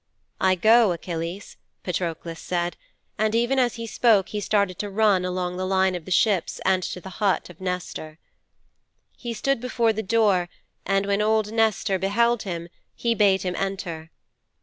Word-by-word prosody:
"' -, -, -27 dB
'"I 190 Hz, 0 st, +4 dB
go, 220 Hz, +2 st, +5 dB
Achilles," 170 Hz, +2 st, -6 dB, 0.3 s
Patroklos 170 Hz, -2 st, -3 dB
said, 175 Hz, -1 st, -2 dB, 0.4 s
and 215 Hz, +1 st, +1 dB
even 240 Hz, +3 st, +2 dB
as 245 Hz, -2 st, +1 dB
he 230 Hz, -1 st, -5 dB
spoke 220 Hz, -3 st, +3 dB
he 210 Hz, -, -3 dB
started 200 Hz, -3 st, 0 dB
to 205 Hz, -, -3 dB
run 200 Hz, -2 st, +3 dB
along 180 Hz, 0 st, -2 dB
the 185 Hz, 0 st, -2 dB
line 190 Hz, 0 st, +2 dB
of 175 Hz, -3 st, -5 dB
the -, -, -9 dB
ships 190 Hz, 0 st, +1 dB
and 185 Hz, -1 st, +3 dB
to 180 Hz, -, -4 dB
the 190 Hz, 0 st, -10 dB
hut 195 Hz, -3 st, +1 dB
of 175 Hz, -, -18 dB
Nestor.' 180 Hz, -4 st, -4 dB, 1.0 s
'He 235 Hz, -2 st, -6 dB
stood 275 Hz, +2 st, 0 dB
before 235 Hz, -2 st, +1 dB
the 220 Hz, -, -2 dB
door, 200 Hz, -4 st, +2 dB, 0.4 s
and 195 Hz, +1 st, +2 dB
when 200 Hz, +1 st, +1 dB
old 215 Hz, 0 st, +1 dB
Nestor 220 Hz, -3 st, +1 dB
beheld 230 Hz, +5 st, +2 dB
him 170 Hz, -4 st, -5 dB, 0.3 s
he 235 Hz, -1 st, 0 dB
bade 200 Hz, -4 st, +3 dB
him 180 Hz, -1 st, -2 dB
enter. 180 Hz, -5 st, -4 dB
195 Hz, 170 wpm, -24 LUFS, 180-220 Hz, 1.0 s, go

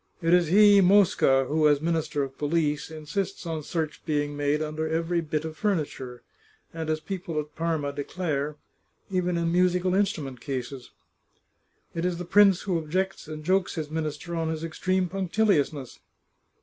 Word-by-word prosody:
It 165 Hz, -1 st, +2 dB
is 175 Hz, -2 st, +4 dB
he, 205 Hz, +3 st, +7 dB
Mosca, 180 Hz, -8 st, +4 dB
who, 155 Hz, +3 st, +2 dB
as 145 Hz, -1 st, +4 dB
Minister 160 Hz, -2 st, -1 dB
of 135 Hz, -1 st, -6 dB
Police, 150 Hz, 0 st, 0 dB
insists 160 Hz, +5 st, -4 dB
on 160 Hz, -2 st, -3 dB
search 155 Hz, 0 st, -4 dB
being 145 Hz, -1 st, -1 dB
made 145 Hz, +1 st, 0 dB
under 155 Hz, +1 st, -3 dB
every 165 Hz, +2 st, 0 dB
bit 155 Hz, -1 st, -3 dB
of 160 Hz, -1 st, -6 dB
furniture, 145 Hz, -, -2 dB, 0.5 s
and, 160 Hz, -1 st, -4 dB
as 155 Hz, 0 st, 0 dB
people 170 Hz, -2 st, -4 dB
at 150 Hz, 0 st, -7 dB
Parma 160 Hz, -4 st, -1 dB
declare, 145 Hz, -1 st, -3 dB, 0.6 s
even 180 Hz, -2 st, 0 dB
in 170 Hz, 0 st, 0 dB
musical 180 Hz, +1 st, +2 dB
instrument 150 Hz, -, -1 dB
cases. 130 Hz, -1 st, -5 dB, 1.0 s
It 165 Hz, -, -3 dB
is 180 Hz, -1 st, 0 dB
the 180 Hz, -, -5 dB
prince 195 Hz, +1 st, +5 dB
who 180 Hz, -4 st, 0 dB
objects, 185 Hz, +4 st, -2 dB
and 155 Hz, -1 st, -7 dB
jokes 185 Hz, +3 st, +1 dB
his 155 Hz, -2 st, -4 dB
minister 160 Hz, +1 st, -4 dB
on 165 Hz, -1 st, -1 dB
his 160 Hz, 0 st, -3 dB
extreme 185 Hz, +3 st, 0 dB
punctiliousness. 180 Hz, -, 0 dB
160 Hz, 160 wpm, -26 LUFS, 150-180 Hz, 1.0 s, he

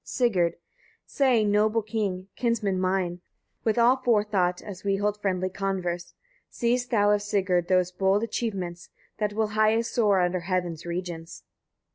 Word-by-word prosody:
Sigurd. 190 Hz, -10 st, +1 dB
10. -, -, -27 dB, 0.5 s
Say, 255 Hz, -6 st, +2 dB
noble 210 Hz, +2 st, +2 dB
king! 200 Hz, -4 st, -3 dB
kinsman 220 Hz, -6 st, 0 dB
mine! 185 Hz, -1 st, -1 dB, 0.4 s
with 220 Hz, 0 st, +1 dB
all 240 Hz, +3 st, +5 dB
forethought, 205 Hz, -7 st, +1 dB
as 190 Hz, -3 st, -9 dB
we 200 Hz, -1 st, +1 dB
hold 205 Hz, +1 st, -1 dB
friendly 185 Hz, -2 st, 0 dB
converse; 180 Hz, -3 st, -3 dB, 0.3 s
seest 245 Hz, +1 st, 0 dB
thou 205 Hz, -3 st, +3 dB
of 205 Hz, 0 st, +2 dB
Sigurd 185 Hz, -4 st, 0 dB
those 180 Hz, -1 st, +2 dB
bold 195 Hz, +3 st, +1 dB
achievements, 195 Hz, -7 st, -4 dB, 0.3 s
that 210 Hz, -1 st, -1 dB
will 220 Hz, 0 st, 0 dB
highest 215 Hz, +2 st, +2 dB
soar 210 Hz, -5 st, +3 dB
under 180 Hz, 0 st, +1 dB
heaven's 175 Hz, -2 st, -3 dB
regions?" 170 Hz, -1 st, -5 dB
200 Hz, 145 wpm, -26 LUFS, 180-215 Hz, 0.5 s, all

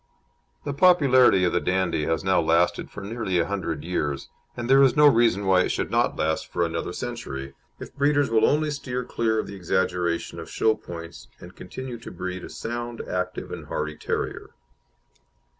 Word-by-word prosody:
The 145 Hz, -, -3 dB
popularity 140 Hz, -, +5 dB
of 90 Hz, -, +2 dB
the 90 Hz, -, +3 dB
Dandie 85 Hz, -5 st, 0 dB
has 80 Hz, -1 st, -1 dB
now 95 Hz, -2 st, +3 dB
lasted 85 Hz, +2 st, +1 dB
for 100 Hz, -, -9 dB
nearly 100 Hz, -2 st, -2 dB
a 85 Hz, -, +2 dB
hundred 95 Hz, -5 st, -3 dB
years, 75 Hz, -5 st, -2 dB, 0.3 s
and 120 Hz, 0 st, -3 dB
there 135 Hz, +1 st, +6 dB
is 135 Hz, -2 st, +5 dB
no 150 Hz, 0 st, +6 dB
reason 115 Hz, -7 st, +4 dB
why 95 Hz, -1 st, +4 dB
it -, -, 0 dB
should -, -, -2 dB
not -, -, +2 dB
last 80 Hz, 0 st, -1 dB
for 85 Hz, -, +1 dB
another 85 Hz, +1 st, -3 dB
century, 70 Hz, -, -6 dB, 0.3 s
if -, -, -10 dB
breeders 145 Hz, -2 st, +2 dB
will 110 Hz, -1 st, +3 dB
only 150 Hz, +1 st, +1 dB
steer 125 Hz, -3 st, -4 dB
clear 115 Hz, -2 st, -1 dB
of -, -, -1 dB
the 100 Hz, -, -8 dB
exaggeration 90 Hz, -2 st, -1 dB
of -, -, -8 dB
show 110 Hz, -, +2 dB
points, 85 Hz, -4 st, -9 dB
and -, -, -12 dB
continue 130 Hz, -3 st, -7 dB
to 115 Hz, -, -9 dB
breed 90 Hz, 0 st, -5 dB
a -, -, -8 dB
sound, 120 Hz, 0 st, -5 dB
active, 90 Hz, 0 st, -4 dB
and -, -, -7 dB
hardy 75 Hz, 0 st, -3 dB
terrier. -, -, -4 dB
95 Hz, 185 wpm, -25 LUFS, 85-125 Hz, 0.3 s, there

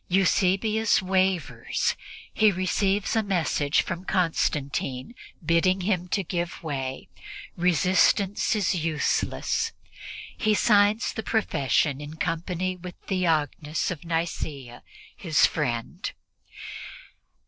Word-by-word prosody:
Eusebius 195 Hz, +4 st, +2 dB
wavers. 185 Hz, -3 st, 0 dB, 0.4 s
He 215 Hz, -1 st, +4 dB
receives 195 Hz, +3 st, 0 dB
a 225 Hz, -, +3 dB
message 170 Hz, -7 st, +1 dB
from 175 Hz, -, -5 dB
Constantia 150 Hz, -, -1 dB, 0.3 s
bidding 185 Hz, +3 st, +3 dB
him 180 Hz, -2 st, 0 dB
give 175 Hz, -1 st, -2 dB
way; 135 Hz, -4 st, -4 dB, 0.5 s
resistance 185 Hz, -, +2 dB
is 200 Hz, -3 st, +1 dB
useless. 165 Hz, -, -1 dB, 0.6 s
He 215 Hz, -3 st, +2 dB
signs 205 Hz, +1 st, +3 dB
the 220 Hz, -, -3 dB
profession 145 Hz, -, +1 dB
in 150 Hz, +1 st, -8 dB
company 175 Hz, +2 st, -2 dB
with 180 Hz, 0 st, -9 dB
Theognis 160 Hz, -4 st, 0 dB
of 170 Hz, -3 st, -6 dB
Nicea, 160 Hz, -7 st, -3 dB, 0.3 s
his 160 Hz, -5 st, +3 dB
friend. 120 Hz, -7 st, -2 dB
180 Hz, 95 wpm, -26 LUFS, 155-195 Hz, 0.6 s, He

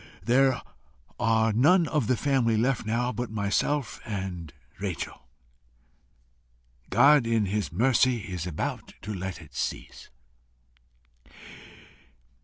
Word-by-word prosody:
There 130 Hz, +1 st, +3 dB, 0.6 s
are 110 Hz, -1 st, +2 dB
none 160 Hz, -, +4 dB
of 145 Hz, -8 st, 0 dB
the 125 Hz, -, +2 dB
family 125 Hz, -5 st, +1 dB
left 120 Hz, 0 st, 0 dB
now 120 Hz, +3 st, 0 dB
but 125 Hz, -1 st, -4 dB
myself 110 Hz, +4 st, -1 dB
and 95 Hz, -7 st, -5 dB, 0.3 s
Rachel. 95 Hz, -7 st, -5 dB, 1.6 s
God 145 Hz, -4 st, +5 dB
in 115 Hz, -2 st, +2 dB
his 100 Hz, 0 st, -2 dB
mercy 125 Hz, +4 st, +2 dB
is 90 Hz, -3 st, -5 dB
about 85 Hz, -, -4 dB
to 105 Hz, -, -4 dB
let 95 Hz, -1 st, -5 dB
it 75 Hz, -, -18 dB
cease. -, -, -5 dB
115 Hz, 105 wpm, -27 LUFS, 100-130 Hz, 1.6 s, God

